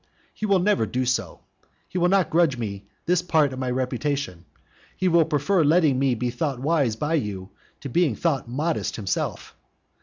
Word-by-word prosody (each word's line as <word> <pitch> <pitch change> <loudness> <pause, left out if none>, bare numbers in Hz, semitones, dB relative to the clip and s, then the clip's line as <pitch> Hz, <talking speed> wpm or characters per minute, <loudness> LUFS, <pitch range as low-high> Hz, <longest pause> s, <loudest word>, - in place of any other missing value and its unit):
He 215 - -4
will 200 -1 +4
never 185 - +2
do 125 +5 -1
so. 125 +1 -2 0.5
He 180 - -3
will 175 0 +3
not 195 -2 +2
grudge 165 -5 +3
me 100 -4 -5 0.2
this 180 0 +2
part 155 -6 +2
of 130 - -6
my 130 -1 -2
reputation, 130 - -2 0.5
he 185 - +1
will 170 -2 +4
prefer 160 +4 +1
letting 150 -3 +3
me 135 -2 +2
be 120 +1 -2
thought 135 +1 -2
wise 140 -5 +1
by 150 +8 -2
you 100 - -2 0.3
to - - -5
being 145 -2 +1
thought 140 -6 -1
modest 155 +7 -1
himself. 100 -5 -3
140 Hz, 180 wpm, -24 LUFS, 125-170 Hz, 0.5 s, will